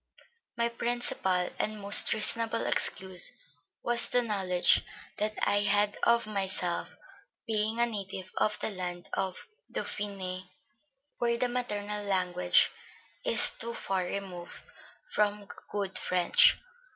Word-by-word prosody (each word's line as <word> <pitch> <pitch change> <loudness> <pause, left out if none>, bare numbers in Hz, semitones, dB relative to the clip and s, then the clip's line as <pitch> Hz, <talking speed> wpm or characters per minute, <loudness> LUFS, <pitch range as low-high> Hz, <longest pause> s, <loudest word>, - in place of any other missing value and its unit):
My 235 0 +1
principal 235 -6 -1
and 215 0 -2
most 200 0 +5
reasonable 230 +1 +1
excuse 190 -1 +3 0.5
was 240 0 +5
the 245 0 +2
knowledge 190 -5 +2 0.4
that 215 +1 0
I 205 - +2
had 205 0 +2
of 235 0 +3
myself, 190 -4 -2 0.5
being 220 0 0
a 235 - +4
native 195 -4 -6
of 210 - +1
the - - 0
land 180 -2 -6
of 190 -1 -3 0.3
Dauphiné, 190 -3 -4 0.7
where 235 -1 +1
the 250 +1 0
maternal 210 -4 -3
language 180 -2 +2 0.5
is - - +6
too 235 0 -6
far 190 -1 -2
removed 180 -2 -7 0.4
from 205 - -1 0.2
good 200 -2 -3
French.... 185 - +3
205 Hz, 115 wpm, -29 LUFS, 185-230 Hz, 0.7 s, is